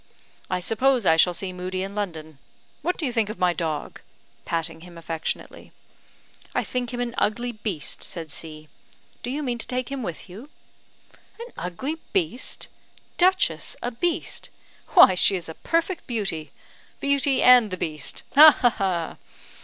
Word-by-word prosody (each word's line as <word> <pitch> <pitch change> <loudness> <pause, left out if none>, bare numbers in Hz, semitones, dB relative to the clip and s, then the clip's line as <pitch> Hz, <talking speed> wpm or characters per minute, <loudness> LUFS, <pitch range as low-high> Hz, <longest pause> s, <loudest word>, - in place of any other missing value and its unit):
"I 185 - 0
suppose 235 +5 +2
I 160 - +6
shall 175 +2 +4
see 185 +2 -3
Moodie 185 +1 -3
in 195 +1 -6
London. 160 -8 -5 0.4
What 360 - -1
do 320 - -2
you 250 - -2
think 225 -3 +1
of 215 - -6
my 180 -1 +2
dog?" 160 -3 -4 0.4
patting 165 -1 -2
him 175 0 -12
affectionately. 165 -1 -5 0.8
"I - - +2
think 250 -2 -3
him 245 - -4
an 240 -1 -2
ugly 240 +3 0
beast," 210 -8 -5
said 165 -3 -6
C. 155 -1 -6 0.5
"Do - - -5
you 290 +4 -3
mean 245 -3 -2
to - - -2
take 255 0 -3
him 275 -1 -3
with 175 -6 -6
you?" 215 +10 -11 0.9
"An 470 +1 -9
ugly 260 - -4 0.2
beast! 320 - -2 0.5
Duchess 370 +1 +2
a 245 - -1
beast? 335 +8 -2 0.5
Why - - +9
she 190 +2 +4
is 175 -3 -4
a 160 - -6
perfect 335 - -1
beauty! 195 -10 -1 0.5
Beauty 280 -1 +2
and 250 -3 +7
the 185 - -4
beast! 155 -3 -2
Ha, 310 +2 +11
ha, 245 - +5
ha! 180 -6 -2
210 Hz, 160 wpm, -24 LUFS, 170-255 Hz, 0.9 s, Ha